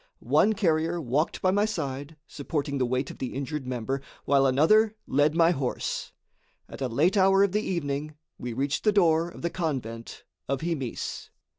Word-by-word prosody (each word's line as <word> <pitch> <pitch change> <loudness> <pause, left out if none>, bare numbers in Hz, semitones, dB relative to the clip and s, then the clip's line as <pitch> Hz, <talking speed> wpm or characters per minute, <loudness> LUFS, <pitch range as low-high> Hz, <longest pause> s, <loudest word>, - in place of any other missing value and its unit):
One 220 - +5
carrier 170 -4 +1
walked 145 +2 -1
by 185 - +4
my 205 +2 +2
side, 145 -7 -4
supporting 145 -2 -3
the 125 - +1
weight 130 +2 -1
of - - -13
the 130 - -4
injured 140 0 -4
member, 130 +2 -2 0.2
while 135 -1 +4
another 210 +12 +4
led 145 +3 +2
my 165 0 +5
horse. 135 -6 -3 0.6
At - - -10
a 130 - 0
late 150 - +2
hour 195 +1 +5
of 200 - +2
the 210 +2 +1
evening 150 -6 -3 0.2
we 125 - -4
reached 135 +3 -1
the 215 - +4
door 170 -4 +3
of - - -12
the 170 - -1
convent 125 -9 -4 0.3
of 140 -1 -1
Himis. 155 -8 -4
150 Hz, 175 wpm, -27 LUFS, 135-175 Hz, 0.6 s, One